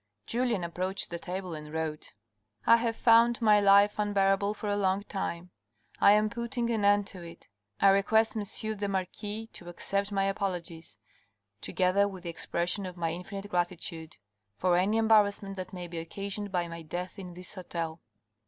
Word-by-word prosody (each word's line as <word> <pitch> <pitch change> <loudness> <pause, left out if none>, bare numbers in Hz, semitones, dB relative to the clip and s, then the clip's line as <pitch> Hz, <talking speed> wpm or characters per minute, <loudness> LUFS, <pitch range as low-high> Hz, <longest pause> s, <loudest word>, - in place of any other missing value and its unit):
Julien 235 -5 0
approached 185 +3 -2
the 170 - -3
table 180 0 -5
and 150 -1 -8
wrote: 160 -1 -4 0.3
" 105 -1 -38
I 230 - +7
have 230 -1 -1
found 235 +1 +5
my 215 -3 +5
life 200 +1 +5
unbearable 200 0 +2
for 210 - -6
a 205 - +1
long 195 0 +1
time; 180 -3 -4 0.5
I 200 - +7
am 210 +1 +3
putting 235 +2 -3
an 220 -3 0
end 205 0 +4
to 185 - -9
it. 170 -1 -12 0.3
I 195 - +6
request 220 +4 +3
monsieur 215 +1 -2
the 205 -1 -3
marquis 205 +3 -4
to 175 - -9
accept 200 +3 -2
my 195 -1 +1
apologies 175 - -3 0.6
(together 190 +2 +2
with 190 -2 -9
the 170 - -4
expression 175 +4 -1
of 180 -1 -9
my 165 -1 -1
infinite 195 +4 -6
gratitude) 175 - -3 0.4
for 180 - +2
any 195 +5 +2
embarrassment 205 -3 +3
that 185 0 -6
may 180 -2 -6
be 170 -1 -5
occasioned 200 +4 -5
by 175 -2 0
my 165 0 -7
death 180 +5 -6
in 180 -2 -8
his 180 +3 -2
hotel." 170 -4 -5
195 Hz, 175 wpm, -29 LUFS, 175-205 Hz, 0.6 s, I